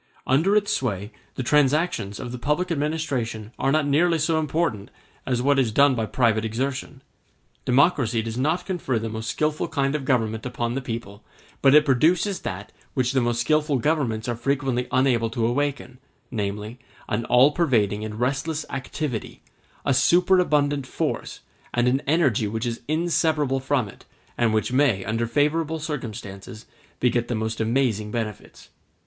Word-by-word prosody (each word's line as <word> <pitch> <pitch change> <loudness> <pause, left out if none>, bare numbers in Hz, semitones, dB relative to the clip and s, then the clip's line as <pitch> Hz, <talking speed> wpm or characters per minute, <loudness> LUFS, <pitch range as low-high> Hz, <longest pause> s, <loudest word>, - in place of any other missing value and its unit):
Under 160 +10 +3
its 205 -1 +2
sway 105 -4 -2 0.2
the 130 - -3
transactions 145 - +1
of 125 - -6
the 125 - -6
public 150 +7 0
administration 140 -8 -2
are 135 - +1
not 155 0 +2
nearly 165 +4 +3
so 160 +1 +1
important 155 -9 -1 0.4
as 125 -1 0
what 140 0 +3
is 120 -4 +1
done 140 +4 +5
by 115 -3 -1
private 115 -3 +2
exertion. 130 +4 -3 0.6
Democracy 125 -4 +3
does 115 0 -5
not 155 +8 0
confer 170 - -1
the 110 0 -3
most 110 +1 -5
skilful 155 0 -1
kind 140 -1 0
of 150 -2 -2
government 110 -4 0
upon 120 -1 -3
the 135 - -2
people, 115 -4 -6 0.4
but 135 +1 +6
it 150 0 +7
produces 170 - +2
that 100 +2 -6 0.2
which 125 -2 +1
the 135 -2 +2
most 120 0 0
skilful 150 +2 +2
governments 125 -6 0
are 120 - -1
frequently 130 0 -1
unable 125 -3 +2
to 115 0 -1
awaken, 130 0 -2 0.3
namely, 105 +1 -4 0.3
an 115 0 -1
all 125 +5 +5
pervading 110 - +1
and 110 0 -6
restless 145 +5 -1
activity, 135 -2 -4 0.4
a 140 - +3
superabundant 150 -2 +3
force, - - -3 0.3
and 120 0 +2
an 130 +2 +2
energy 140 -9 +2
which 110 +3 -3
is 115 -1 -3
inseparable 155 -3 +1
from 135 -3 0
it, 100 - -14 0.3
and 120 -2 +2
which 110 +3 0
may, 130 -8 +2
under 115 +2 -1
favorable 150 +5 +1
circumstances, 110 -8 -6 0.3
beget 120 -1 +1
the 120 - -2
most 110 +1 -2
amazing 110 -2 0
benefits. 110 -2 -6
130 Hz, 160 wpm, -24 LUFS, 115-150 Hz, 0.6 s, it